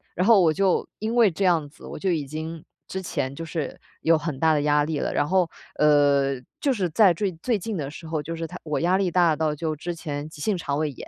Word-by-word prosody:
然 180 Hz, -, +1 dB
后 225 Hz, -4 st, +7 dB
我 165 Hz, -3 st, +4 dB
就 190 Hz, +1 st, +1 dB
因 220 Hz, +2 st, -2 dB
为 230 Hz, -6 st, +5 dB
这 190 Hz, +4 st, -1 dB
样 160 Hz, -5 st, +2 dB
子， -, -, -15 dB
我 -, -, -7 dB
就 190 Hz, +1 st, 0 dB
已 155 Hz, -4 st, -1 dB
经 155 Hz, +3 st, -6 dB, 0.2 s
之 190 Hz, -, -4 dB
前 135 Hz, -7 st, -3 dB
就 165 Hz, -, -6 dB
是 160 Hz, -3 st, -4 dB, 0.2 s
有 165 Hz, 0 st, +4 dB
很 155 Hz, -3 st, -4 dB
大 160 Hz, +1 st, +4 dB
的 150 Hz, -, +2 dB
压 150 Hz, 0 st, +3 dB
力 150 Hz, -1 st, -2 dB
了， -, -, -2 dB
然 -, -, +1 dB
后 180 Hz, -1 st, +2 dB, 0.3 s
呃， 145 Hz, -2 st, +4 dB, 0.3 s
就 275 Hz, -2 st, +1 dB
是 190 Hz, -6 st, -1 dB
在 190 Hz, +2 st, +5 dB
最 190 Hz, +3 st, -1 dB
最 235 Hz, -4 st, +1 dB
近 215 Hz, +1 st, -4 dB
的 140 Hz, -4 st, -3 dB
时 160 Hz, +2 st, -10 dB
候 160 Hz, -2 st, -2 dB
就 165 Hz, +3 st, -5 dB
是 165 Hz, 0 st, -4 dB
他 180 Hz, -, -8 dB
我 150 Hz, -2 st, -2 dB
压 180 Hz, +2 st, +3 dB
力 190 Hz, -2 st, +1 dB
大 170 Hz, -3 st, +4 dB
到 155 Hz, -2 st, 0 dB
就 155 Hz, 0 st, -2 dB
之 175 Hz, +3 st, -4 dB
前 145 Hz, -3 st, -5 dB
急 150 Hz, -, -12 dB
性 200 Hz, +2 st, 0 dB
肠 140 Hz, -4 st, -2 dB
胃 155 Hz, -1 st, 0 dB
炎。 135 Hz, -, -10 dB
165 Hz, 280 characters per minute, -24 LUFS, 150-185 Hz, 0.3 s, 后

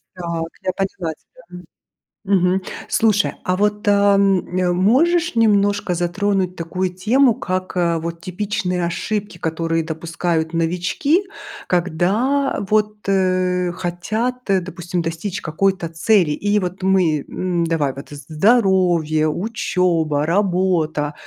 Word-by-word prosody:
Так, 170 Hz, -2 st, -4 dB
я 185 Hz, -, 0 dB
поняла 190 Hz, -4 st, -3 dB
тебя, 170 Hz, -, -22 dB, 0.9 s
м. -, -, +4 dB
Мгм. 180 Hz, +2 st, +1 dB, 0.3 s
Слушай, 210 Hz, -2 st, +2 dB
а 185 Hz, -, +1 dB
вот, 210 Hz, +1 st, 0 dB
ам, 200 Hz, -2 st, +4 dB
э, 180 Hz, -1 st, +2 dB
можешь 325 Hz, -, +2 dB
немножко 205 Hz, -4 st, +2 dB
затронуть 185 Hz, +1 st, -1 dB
такую 180 Hz, +2 st, -3 dB
тему, 240 Hz, +7 st, +3 dB
как, 185 Hz, 0 st, -3 dB
а, 170 Hz, -2 st, +1 dB
вот 170 Hz, +1 st, -5 dB
типичные 185 Hz, 0 st, -2 dB
ошибки, 205 Hz, +2 st, -3 dB
которые 165 Hz, 0 st, -1 dB
допускают 165 Hz, 0 st, -2 dB
новички, 180 Hz, -, +1 dB, 0.4 s
когда 195 Hz, -, +1 dB
вот, 210 Hz, 0 st, +1 dB
э, 185 Hz, -2 st, +1 dB
хотят, 215 Hz, +9 st, -3 dB
э, 190 Hz, -1 st, +4 dB
допустим, 175 Hz, -1 st, -4 dB
достичь 165 Hz, +4 st, -4 dB
какой-то 175 Hz, +2 st, 0 dB
цели? 165 Hz, 0 st, +2 dB
И 205 Hz, +6 st, +1 dB
вот 185 Hz, 0 st, -5 dB
мы, 180 Hz, -6 st, +2 dB
м, 180 Hz, -2 st, -1 dB
давай 160 Hz, -5 st, 0 dB
вот 140 Hz, -, -10 dB
з 145 Hz, -, -9 dB
з 140 Hz, -, -12 dB
здоровье, 175 Hz, -4 st, +2 dB
учеба, 175 Hz, -6 st, 0 dB
работа. 175 Hz, -5 st, +1 dB
185 Hz, 125 wpm, -20 LUFS, 170-205 Hz, 0.9 s, м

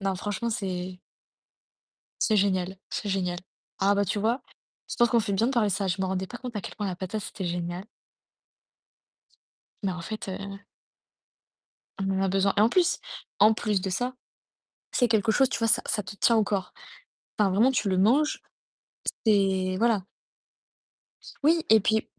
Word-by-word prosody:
Non, 195 Hz, -1 st, 0 dB
franchement, 205 Hz, +5 st, -3 dB
c'est 185 Hz, -3 st, -4 dB, 1.2 s
c'est 220 Hz, -, +3 dB
génial, 190 Hz, -2 st, +1 dB
c'est -, -, -4 dB
génial. 180 Hz, -2 st, -1 dB, 0.4 s
Ah 200 Hz, +1 st, +3 dB
bah 200 Hz, -, +2 dB
tu 200 Hz, +2 st, -1 dB
vois? 230 Hz, +5 st, +1 dB, 0.5 s
Je -, -, -4 dB
pense 240 Hz, -, +5 dB
qu'on 235 Hz, -, +4 dB
fait 205 Hz, -, -3 dB
bien 210 Hz, +4 st, +2 dB
de 270 Hz, -, -1 dB
parler 220 Hz, -4 st, +2 dB
ça. 195 Hz, 0 st, -1 dB
Je 185 Hz, +1 st, -1 dB
me -, -, +1 dB
rendais 190 Hz, 0 st, -2 dB
pas 240 Hz, -, -8 dB
compte 250 Hz, -2 st, -7 dB
à 210 Hz, -, -2 dB
quel -, -, -8 dB
point 210 Hz, -, -3 dB
la 185 Hz, -2 st, -2 dB
patate, 195 Hz, +3 st, -4 dB
c'était 190 Hz, -2 st, -6 dB
génial 175 Hz, +2 st, -3 dB, 2.0 s
mais 195 Hz, -, +1 dB
en 180 Hz, -1 st, -6 dB
fait, 215 Hz, +4 st, -6 dB
heu 195 Hz, +1 st, -6 dB, 1.4 s
on 195 Hz, 0 st, -2 dB
en 190 Hz, 0 st, 0 dB
a 195 Hz, -, +2 dB
besoin 195 Hz, +1 st, +2 dB
et -, -, +5 dB
en 220 Hz, -, +5 dB
plus 360 Hz, +5 st, +2 dB, 0.4 s
en 215 Hz, +2 st, +7 dB
plus 210 Hz, -3 st, 0 dB
de 190 Hz, -, -2 dB
ça, 245 Hz, +7 st, -1 dB, 0.8 s
c'est 245 Hz, -, +3 dB
quelque 220 Hz, -1 st, +2 dB
chose, 265 Hz, +4 st, +3 dB
tu -, -, -2 dB
vois, 225 Hz, -, +2 dB
ça 240 Hz, +2 st, +4 dB
ça 210 Hz, -, -1 dB
te 200 Hz, -, -9 dB
tient 230 Hz, +3 st, +3 dB
au 220 Hz, -, +4 dB
corps. 195 Hz, -2 st, -2 dB, 0.7 s
Enfin 205 Hz, -2 st, +3 dB
vraiment, 220 Hz, +8 st, +4 dB
tu 225 Hz, -5 st, 0 dB
le 185 Hz, -1 st, +1 dB
manges, 265 Hz, +10 st, +3 dB, 0.9 s
c'est 190 Hz, -3 st, +2 dB
voilà. 225 Hz, -5 st, +2 dB, 1.4 s
Oui, 325 Hz, +2 st, +3 dB
et 220 Hz, 0 st, +8 dB
puis 220 Hz, +2 st, +1 dB
200 Hz, 180 wpm, -27 LUFS, 190-225 Hz, 2.0 s, et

